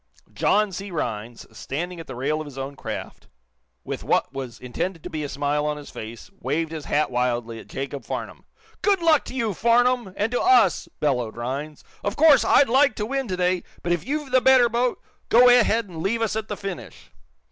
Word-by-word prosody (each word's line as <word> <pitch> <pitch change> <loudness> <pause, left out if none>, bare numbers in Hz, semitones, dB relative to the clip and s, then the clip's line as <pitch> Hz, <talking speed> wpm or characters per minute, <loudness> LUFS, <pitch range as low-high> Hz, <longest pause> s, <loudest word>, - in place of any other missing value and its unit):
John 210 -1 +2
C. 195 +2 -6
Rhinds, 115 - -4
standing 175 +5 -5
at 165 - -9
the 130 - -7
rail 150 +5 -1
of - - -6
his 140 -2 -11
own 135 +1 -5
craft, - - -7 0.6
with - - -5
what - - +1
was 130 -4 -6
intended 165 +7 -4
to - - -7
be 155 -1 -3
a 145 - -4
smile 150 +2 -1
his 145 -1 -10
face, 110 - -9
waved 155 +5 -1
his 155 -3 -6
hat 150 -2 +1
wildly 120 -2 -1
at - - -13
Jacob 140 +1 -5
Farnum. - - -6 0.4
"Good 400 -2 +3
luck 325 -4 +4
to - - -8
you, 230 -5 0
Farnum 240 0 +2
and 210 +3 0
to 245 - 0
us!" 385 +1 +4
bellowed 125 -6 -1
Rhinds. 140 +5 -5 0.2
"Of 205 +1 -2
course, 285 -6 +6
I'd 275 +4 +5
like 270 +2 +4
to 210 - -2
win 270 +2 -2
today, 180 -1 0 0.2
but 175 - -1
if 175 -2 0
you've 290 0 -3
the 255 0 +4
better 260 -2 +6
boat, 240 +1 0 0.3
go 245 +2 +7
ahead 230 -2 +4
and 170 -5 -8
leave 230 +6 0
us 220 - -1
at 220 0 -3
the 210 - -5
finish. 195 -3 -8
180 Hz, 200 wpm, -24 LUFS, -, 0.6 s, go